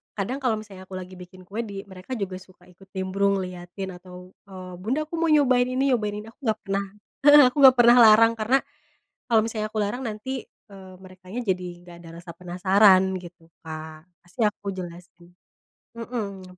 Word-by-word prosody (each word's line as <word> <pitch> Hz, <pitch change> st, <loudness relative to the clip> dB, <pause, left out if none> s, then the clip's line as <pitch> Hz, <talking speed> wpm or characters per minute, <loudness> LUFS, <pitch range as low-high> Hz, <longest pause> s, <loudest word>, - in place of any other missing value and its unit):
kadang 240 Hz, +7 st, -3 dB
kalo 245 Hz, -5 st, 0 dB
misalnya 195 Hz, -3 st, -12 dB
aku 190 Hz, -, -9 dB
lagi 185 Hz, 0 st, -8 dB
bikin 185 Hz, +1 st, -13 dB
kue 210 Hz, +3 st, -6 dB
di 195 Hz, -1 st, -7 dB
mereka 185 Hz, +7 st, -12 dB
juga 190 Hz, -4 st, -4 dB
suka 185 Hz, -1 st, -20 dB
ikut 190 Hz, +2 st, -20 dB
nimbrung 195 Hz, +1 st, 0 dB
liatin 180 Hz, +1 st, -7 dB
atau 180 Hz, 0 st, -13 dB, 0.2 s
eee, 185 Hz, -1 st, -10 dB
"bunda 260 Hz, +10 st, -1 dB
aku 315 Hz, +2 st, -7 dB
mau 335 Hz, -, +1 dB
nyobain 255 Hz, -5 st, +3 dB
ini, 265 Hz, +2 st, 0 dB
nyobain 210 Hz, -4 st, 0 dB
ini," -, -, -14 dB
aku -, -, -35 dB
enggak 215 Hz, 0 st, 0 dB
pernah 195 Hz, 0 st, -1 dB, 0.4 s
heeh, 290 Hz, 0 st, +10 dB
aku -, -, -27 dB
enggak 265 Hz, -2 st, +8 dB
pernah 240 Hz, 0 st, +7 dB
larang 225 Hz, 0 st, +7 dB
karena, 240 Hz, +5 st, +3 dB, 0.7 s
kalo 225 Hz, -, +5 dB
misalnya 215 Hz, -2 st, -3 dB
aku 220 Hz, -, -4 dB
larang 245 Hz, +6 st, -4 dB
nanti, 220 Hz, +2 st, -6 dB, 0.4 s
eee, 190 Hz, -1 st, -12 dB
merekanya 185 Hz, +5 st, -9 dB
jadi 185 Hz, -1 st, -1 dB
enggak 175 Hz, -1 st, -14 dB
ada 165 Hz, -, -12 dB
rasa 170 Hz, 0 st, -11 dB
penasaran, 185 Hz, +2 st, +4 dB, 0.2 s
gitu, 170 Hz, -1 st, -14 dB, 0.2 s
Kak, 155 Hz, -1 st, -9 dB, 0.2 s
pasti 175 Hz, +7 st, -13 dB
aku 205 Hz, -, -22 dB
jelasin 175 Hz, -1 st, -10 dB, 0.6 s
mhm. 200 Hz, -6 st, -7 dB
195 Hz, 180 wpm, -24 LUFS, 180-230 Hz, 0.7 s, heeh